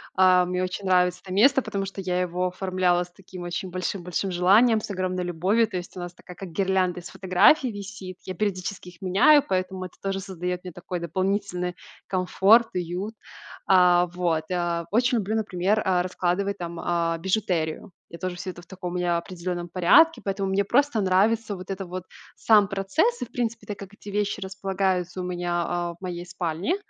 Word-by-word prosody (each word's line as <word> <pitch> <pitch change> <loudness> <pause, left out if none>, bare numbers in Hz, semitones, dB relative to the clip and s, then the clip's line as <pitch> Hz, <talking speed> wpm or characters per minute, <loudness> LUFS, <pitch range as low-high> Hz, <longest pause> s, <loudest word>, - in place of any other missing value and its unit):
А, 185 -1 +5
мне 180 +1 -1
очень 185 +2 -4
нравится 180 -1 +2
это 185 -1 -7
место, 270 +7 +5
потому 195 -1 -3
что 195 0 -8
я 180 -1 0
его 180 +1 -1
оформляла 180 -1 +1
с 180 - -15
таким 185 -1 -11
очень 175 +2 -4
большим 185 +1 -3
большим 180 +2 -2
желанием, 210 +6 +5
с - - -7
огромной 185 -1 -2
любовью. 185 +7 +1
То 200 -4 -4
есть 180 +1 -8
у - - -5
нас 175 0 -6
такая 180 0 -13
как 190 -1 -8
гирлянда 185 0 0
из 170 - -10
фотографий 190 - +4
висит. 200 -3 -8
Я 185 - -5
периодически 185 -1 -3
их 175 -1 -18
меняю, 235 +11 +5
поэтому 185 0 -2
это 180 - -11
тоже 195 0 -1
создает 180 -1 -4
мне 180 - -7
такой 175 +1 -6
дополнительный 180 +1 -2 0.3
комфорт, 195 +5 +4
уют. 180 +5 -3 0.5
А, 180 -2 +5
вот. 170 -3 0
А, 175 -2 -1
очень 245 +3 +3
люблю, 215 +1 -1
например, 205 0 0
а, 180 -2 +2
раскладывать 185 +2 -1
там, 170 -1 -5
а, 170 -1 0
бижутерию. 185 -1 -1 0.2
Я 170 - -10
тоже 185 -1 -4
всё 185 - -5
это 175 - -12
в - - -18
таком 180 -1 -6
у - - -4
меня 175 -1 +1
определенном 175 0 -4
порядке, 240 - +5
поэтому 195 -1 -2
мне 195 +1 +2
просто 245 +2 +2
нравится 205 +3 +2
вот 185 - -10
это 195 0 -4
вот 180 +1 -6 0.3
сам 210 -3 +5
процесс. 195 - 0
И - - -1
в - - -22
принципе, 235 -2 -3
так 205 - -5
как 195 +1 -10
эти 205 - -16
вещи 205 +1 -1
располагаются 190 -2 -2
у - - -4
меня, 175 -1 -1
а, 175 0 -2
в - - -21
моей 175 -2 -5
спальне, 180 - -2
185 Hz, 195 wpm, -25 LUFS, 180-200 Hz, 0.5 s, А